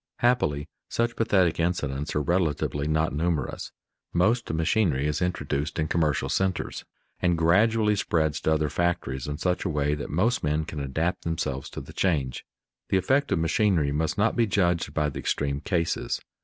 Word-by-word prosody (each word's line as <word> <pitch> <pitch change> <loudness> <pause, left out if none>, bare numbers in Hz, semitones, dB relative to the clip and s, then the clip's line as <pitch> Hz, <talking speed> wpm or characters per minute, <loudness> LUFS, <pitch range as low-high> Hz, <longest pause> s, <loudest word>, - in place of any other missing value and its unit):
Happily 120 - +1 0.2
such 120 +1 0
pathetic 95 -7 +2
incidents 75 -4 -1
are 75 - +1
relatively 75 -3 0
not 80 -1 +1
numerous. 80 -3 -2 0.4
Most 110 +8 +2
machinery 80 -3 +1
is 75 +3 -1
introduced 75 -5 -2
in 80 -1 0
commercial 80 -2 +1
centers, 95 -1 -1 0.4
and 90 -2 +2
gradually 105 +6 +3
spreads 80 -6 0
to 80 - +2
other 75 -1 +1
factories 80 -6 -1
in 75 0 -3
such 90 +2 0
a 95 - -1
way 75 -1 +1
that 75 - -4
most 110 +10 +1
men 75 +1 0
can 75 - -6
adapt 80 +6 -1
themselves 75 -5 -3
to - - -7
the - - -12
change. 70 -9 0 0.5
The 95 - +3
effect 135 +10 +1
of - - +3
machinery 80 -2 +2
must 80 +7 -1
not 105 +3 +2
be 115 -2 +3
judged 85 -6 +1
by 75 -1 +1
the 70 - -6
extreme 70 -1 -1
cases. 85 -2 -1
80 Hz, 170 wpm, -26 LUFS, 75-95 Hz, 0.5 s, gradually